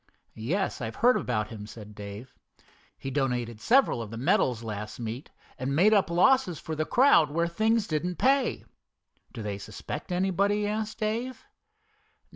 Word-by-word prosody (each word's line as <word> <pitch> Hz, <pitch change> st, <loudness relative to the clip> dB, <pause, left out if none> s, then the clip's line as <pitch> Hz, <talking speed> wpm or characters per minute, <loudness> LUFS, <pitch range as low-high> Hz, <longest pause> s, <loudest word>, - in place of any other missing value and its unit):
"Yes, 160 Hz, -, -2 dB
I've 115 Hz, -1 st, -4 dB
heard 245 Hz, +2 st, +4 dB
about 105 Hz, -4 st, -1 dB
him," 105 Hz, -2 st, -8 dB
said 105 Hz, -1 st, -11 dB
Dave. 105 Hz, +4 st, -9 dB, 0.6 s
"He 135 Hz, -, -6 dB
donated 125 Hz, -5 st, -1 dB
several 250 Hz, -, +3 dB
of 110 Hz, -, -6 dB
the 115 Hz, -, -7 dB
medals 120 Hz, -1 st, +1 dB
last 105 Hz, 0 st, -6 dB
meet, 115 Hz, +3 st, -5 dB, 0.3 s
and 135 Hz, +2 st, -1 dB
made 200 Hz, +8 st, +5 dB
up 200 Hz, -5 st, +3 dB
losses 180 Hz, -, +3 dB
for 160 Hz, -, -5 dB
the 155 Hz, 0 st, -1 dB
crowd 240 Hz, -, +5 dB
where 170 Hz, +3 st, 0 dB
things 220 Hz, +5 st, +1 dB
didn't 175 Hz, +2 st, -2 dB
pay." 270 Hz, +5 st, +1 dB, 0.7 s
"Do 115 Hz, -4 st, -7 dB
they 100 Hz, -1 st, -4 dB
suspect 100 Hz, -, -7 dB
anybody?" 195 Hz, +3 st, +1 dB
asked 215 Hz, +1 st, -3 dB
Dave. 235 Hz, -, -3 dB
155 Hz, 155 wpm, -28 LUFS, -, 0.7 s, made